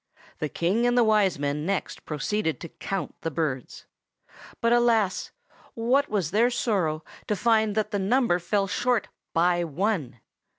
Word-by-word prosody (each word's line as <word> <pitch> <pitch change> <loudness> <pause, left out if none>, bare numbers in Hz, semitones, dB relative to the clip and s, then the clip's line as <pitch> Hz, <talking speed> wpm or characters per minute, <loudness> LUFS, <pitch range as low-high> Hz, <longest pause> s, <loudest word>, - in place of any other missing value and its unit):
The 150 - -2
King 200 +11 +1
and 245 0 +2
the 240 - +6
Wise 210 -5 +3
Men 145 +1 -2
next 195 +3 -3
proceeded 160 +3 -1
to 170 - -7
count 195 +4 -4
the 165 - -2
birds. 140 -5 -3 0.7
But 230 0 +3
alas! 230 -5 +2 0.5
what 250 +5 +2
was 195 -7 -1
their 230 +4 +4
sorrow 180 -10 0 0.2
to 210 - +1
find 220 -1 +2
that 215 -1 0
the 205 - 0
number 215 -2 +2
fell 195 +3 0
short 225 +2 0 0.2
by 175 +1 +2
one! 165 - -2
200 Hz, 155 wpm, -26 LUFS, 165-225 Hz, 0.7 s, the